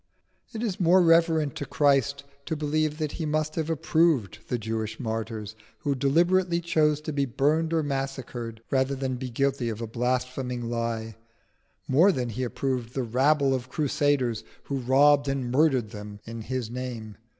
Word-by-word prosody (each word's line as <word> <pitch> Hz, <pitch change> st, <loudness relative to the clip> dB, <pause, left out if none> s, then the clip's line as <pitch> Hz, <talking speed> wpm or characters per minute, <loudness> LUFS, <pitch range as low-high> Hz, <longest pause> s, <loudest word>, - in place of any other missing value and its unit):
It 225 Hz, +1 st, -5 dB
is 205 Hz, -6 st, -2 dB
more 180 Hz, +1 st, +5 dB
reverent 165 Hz, -3 st, +4 dB
to 145 Hz, -, -4 dB
Christ 140 Hz, -1 st, +2 dB, 0.2 s
to 160 Hz, -, -1 dB
believe 155 Hz, 0 st, 0 dB
that 155 Hz, -2 st, -2 dB
He 160 Hz, -, -4 dB
must 155 Hz, 0 st, 0 dB
have 160 Hz, -1 st, -2 dB
approved 155 Hz, -, +1 dB
the 125 Hz, -, -1 dB
Jewish 110 Hz, -1 st, -4 dB
martyrs 110 Hz, -2 st, -4 dB, 0.3 s
who 145 Hz, -, 0 dB
deliberately 170 Hz, +6 st, +2 dB
chose 155 Hz, -3 st, +2 dB
to 155 Hz, 0 st, -4 dB
be 140 Hz, -1 st, +1 dB
burned 150 Hz, +6 st, +1 dB
or 165 Hz, -1 st, +1 dB
massacred 130 Hz, -5 st, -4 dB
rather 135 Hz, 0 st, +1 dB
than 130 Hz, -1 st, -2 dB
be 130 Hz, 0 st, -5 dB
guilty 135 Hz, 0 st, 0 dB
of 110 Hz, -1 st, -5 dB
a 115 Hz, -, -3 dB
blaspheming 125 Hz, +1 st, -2 dB
lie, 115 Hz, -2 st, -3 dB, 0.7 s
more 165 Hz, +10 st, +5 dB
than 125 Hz, -8 st, -2 dB
He 115 Hz, +3 st, -4 dB
approved 125 Hz, -1 st, -2 dB
the 135 Hz, -, 0 dB
rabble 135 Hz, +4 st, +2 dB
of 130 Hz, -1 st, -3 dB
crusaders 140 Hz, -6 st, 0 dB, 0.2 s
who 140 Hz, -1 st, -3 dB
robbed 140 Hz, +3 st, +4 dB
and 135 Hz, -3 st, -1 dB
murdered 130 Hz, -6 st, +2 dB
them 105 Hz, 0 st, -8 dB
in 115 Hz, 0 st, -7 dB
His 125 Hz, -1 st, -4 dB
name. 120 Hz, -4 st, -6 dB
135 Hz, 165 wpm, -26 LUFS, 120-150 Hz, 0.7 s, more